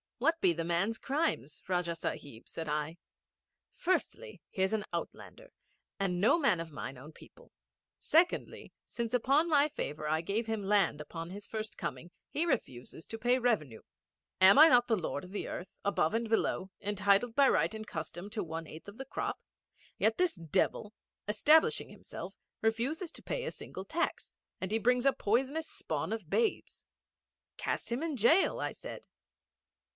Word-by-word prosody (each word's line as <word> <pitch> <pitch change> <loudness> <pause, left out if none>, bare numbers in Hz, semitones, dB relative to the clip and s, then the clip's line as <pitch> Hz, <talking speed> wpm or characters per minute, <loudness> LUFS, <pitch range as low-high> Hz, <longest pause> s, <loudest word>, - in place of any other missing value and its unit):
'What 320 +7 +2
be - - +5
the 165 0 -3
man's 175 +7 0
crimes, 275 - -1
Rajah 175 -2 0
Sahib?' 140 -7 -6
said 165 -1 -6
I. 150 +2 -2 0.8
'Firstly, 375 +6 -2
he 190 - -4
is 190 - +1
an 215 -1 0
outlander - - -6 0.5
and 180 -2 0
no 225 +10 +5
man 275 - +3
of 165 -1 -6
mine 140 -3 -6
own 145 +5 -11
people. - - -17 0.5
Secondly, 340 +3 +1
since 235 0 -3
of 245 - +1
my 295 +1 +4
favour 155 - -4
I 155 +1 +1
gave 205 +7 -1
him 220 -2 -2
land 195 -5 +2
upon 165 +2 -7
his 200 +2 -8
first 215 -1 -5
coming, 175 - -5 0.2
he 320 - 0
refuses 130 - -3
to 225 - -6
pay 245 +2 +3
revenue. 195 - 0 0.6
Am 190 +5 +8
I 315 +2 +10
not 245 -3 +5
the 230 - +3
lord 160 -5 -3
of 180 - -11
the 205 - -4
earth, 180 - -6
above 200 -4 +1
and 230 -1 -1
below, 205 -3 +1
entitled 205 +3 +2
by 280 -1 +6
right - - +2
and 220 0 -6
custom 175 -1 -6
to 215 -2 -2
one 165 -1 -5
eighth 160 +4 -11
of 200 +2 -10
the 270 - -6
crop? 270 - -3 0.6
Yet 220 +1 +2
this 360 -1 +2
devil, 185 +5 -1 0.3
establishing 300 +10 +4
himself, - - -8 0.3
refuses 255 +10 0
to - - -11
pay - - -3
a - - -2
single 190 - -8
tax; 330 +12 -2 0.2
and 190 +1 -4
he 220 - +2
brings 250 +3 +2
a 275 - +5
poisonous 270 +9 0
spawn - - -4
of 215 -8 -6
babes.' 455 - -1 0.7
'Cast - - -3
him 240 +4 -1
into 300 -9 -3
jail,' 325 +10 +5
I - - -1
said. - - -9
215 Hz, 170 wpm, -32 LUFS, 175-265 Hz, 0.8 s, I